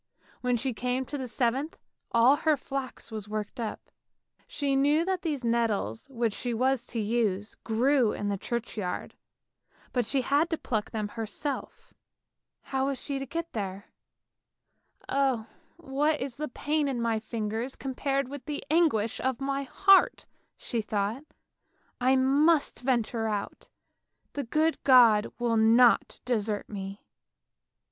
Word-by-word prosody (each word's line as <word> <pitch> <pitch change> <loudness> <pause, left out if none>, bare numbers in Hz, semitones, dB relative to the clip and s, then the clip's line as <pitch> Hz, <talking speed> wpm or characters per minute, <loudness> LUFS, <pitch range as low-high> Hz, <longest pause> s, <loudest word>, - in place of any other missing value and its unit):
When 250 -1 +1
she 255 +2 -2
came 250 +3 -1
to 290 - -5
the 260 - -4
seventh, 255 +6 -1 0.3
all 240 +5 +5
her 310 -1 +2
flax 270 -3 -6
was 215 -2 -6
worked 215 +1 -4
up; 225 -2 -5 0.6
she 280 -2 -1
knew 295 +4 +3
that 375 -1 -1
these 295 -6 -2
nettles 225 - 0
which 235 -4 -1
she 240 +1 -3
was 255 +1 +1
to 235 - -3
use 210 -2 0
grew 240 +1 +3
in 205 - -3
the 200 - 0
churchyard, 215 -3 -4 0.8
but 245 - +2
she 275 - +1
had 290 +6 +2
to 325 - -1
pluck 215 -7 -2
them 215 -2 -3
herself. 230 +6 -5 0.7
How 265 0 -1
was 275 -2 -2
she 275 0 -3
to 270 - -5
get 335 +4 -4
there? 200 -2 -5 0.6
" - - -33
Oh, 265 -5 +1 0.3
what 300 -1 0
is 260 -2 -4
the 305 +1 -3
pain 295 +3 -1
of 270 -3 -1
my 230 -2 0
fingers 225 +3 -3
compared 275 0 -1
with 280 0 -8
the 300 -2 -4
anguish 295 -10 +2
of 260 -2 -1
my 275 0 -1
heart," 390 +8 +4 0.3
she 235 - -2
thought. 215 +5 -2 0.4
" - - -46 0.3
I 260 +2 +4
must 285 +4 +3
venture 235 -3 0
out, 205 -2 -4 0.6
the 285 -2 -3
good 310 +6 +1
God 235 -5 +6
will 235 -1 +1
not 230 +2 +5
desert 215 -4 -1
me! 195 -1 -7
250 Hz, 150 wpm, -28 LUFS, 220-275 Hz, 0.8 s, God